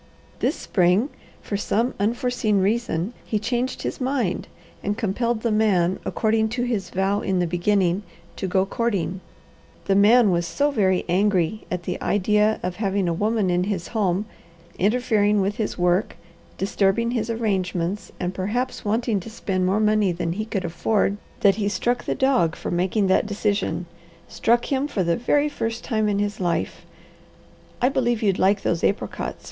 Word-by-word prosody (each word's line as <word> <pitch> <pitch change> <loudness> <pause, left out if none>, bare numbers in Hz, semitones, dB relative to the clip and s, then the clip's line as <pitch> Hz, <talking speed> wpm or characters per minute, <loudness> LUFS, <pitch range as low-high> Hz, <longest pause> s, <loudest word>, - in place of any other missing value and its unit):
This - - +1
spring, 185 +7 +2 0.3
for 205 - -3
some 230 +4 0
unforeseen 225 -1 +1
reason, 205 -1 0
he 215 - -1
changed 245 +4 -2
his - - -4
mind, 255 -8 -1 0.3
and 205 +2 -2
compelled 230 +2 -1
the 230 - +1
man, 190 -5 +2
according 220 0 +1
to 245 - +1
his 220 -7 -2
vow 195 +2 0
in 190 -1 0
the 180 - +2
beginning, 180 +2 +1 0.4
to 190 - -2
go 190 +1 +2
courting. 195 -5 -2 0.6
The 195 - +2
man 210 +2 +6
was 170 -1 0
so 290 +8 +1
very 190 -8 +1
angry 190 +1 +1
at 180 -1 -3
the - - -4
idea 210 +2 +2
of 180 0 -3
having 200 -3 0
a 170 - +1
woman 210 +1 +1
in 175 +1 +1
his 190 -4 -3
home, 200 -3 0 0.5
interfering 210 -1 +2
with 200 +1 0
his 215 - -2
work, 180 +3 +1 0.4
disturbing 200 +4 +1
his 235 -2 -2
arrangements, 195 -4 -1
and 180 0 -2
perhaps 240 +8 -2
wanting 220 0 0
to 190 - -9
spend 185 -4 -1
more 195 +3 +2
money 215 -2 +3
than 170 -1 -2
he 215 +4 -3
could 195 -4 -3
afford, 200 +4 0 0.2
that 200 -1 +4
he 205 -2 0
struck 240 +5 -1
the - - -1
dog 255 -12 +2
for - - -5
making 185 +4 +1
that 190 +2 +2
decision; 205 -3 -1 0.4
struck 240 +4 +1
him 270 +2 +1
for 210 -10 -1
the 170 -1 +1
very 290 +5 +2
first 230 -5 -3
time 215 -3 0
in 200 - 0
his 205 0 -2
life 175 -3 -2 0.9
I 245 - +3
believe 240 -4 0
you'd 195 -3 +2
like 195 +2 +3
those 170 - 0
apricots. 200 - -1
205 Hz, 170 wpm, -23 LUFS, 185-225 Hz, 0.9 s, man